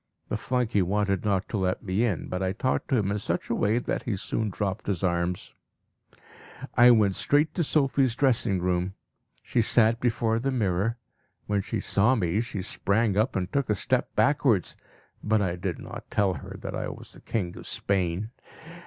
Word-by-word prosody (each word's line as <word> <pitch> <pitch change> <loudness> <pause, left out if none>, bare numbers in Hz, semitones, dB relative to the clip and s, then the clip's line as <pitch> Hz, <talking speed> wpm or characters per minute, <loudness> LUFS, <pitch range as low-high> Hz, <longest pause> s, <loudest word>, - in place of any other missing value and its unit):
The - - -1
flunkey 120 -1 0
wanted 100 0 0
not 100 -2 0
to 110 - -2
let 95 -1 -1
me 100 +3 0
in, 105 -9 -1
but 90 +1 -3
I 95 0 0
talked 130 +5 -1
to 130 - +2
him 100 -3 0
in 105 - -1
such - - -2
a - - +2
way 105 +3 +2
that 125 - -2
he 115 - -2
soon 105 +3 -2
dropped 100 +1 -3
his 95 -3 -1
arms. 85 0 -1 1.2
I 120 0 +7
went 105 -5 +5
straight 145 +9 +2
to 175 - 0
Sophie's 135 -4 +2
dressing 120 -8 +2
room. 90 +1 -1 0.5
She 120 - +1
sat 115 0 +3
before 115 -2 +1
the 135 +4 -1
mirror. 105 -1 0 0.5
When 105 -1 0
she - - -3
saw 110 +6 +2
me, 95 -1 +1
she 110 -5 -5
sprang 100 +2 0
up 110 +5 +1
and 90 -1 -2
took 140 -4 0
a 105 - +3
step 125 +5 0
backwards; 135 - +2 0.5
but 110 0 +2
I 95 -4 0
did 90 -2 -3
not - - -9
tell 100 -3 +2
her - - -8
that - - -4
I - - -3
was - - -9
the - - -14
king 90 -6 -3
of - - -9
Spain. 95 +2 -1
105 Hz, 190 wpm, -27 LUFS, 95-120 Hz, 1.2 s, I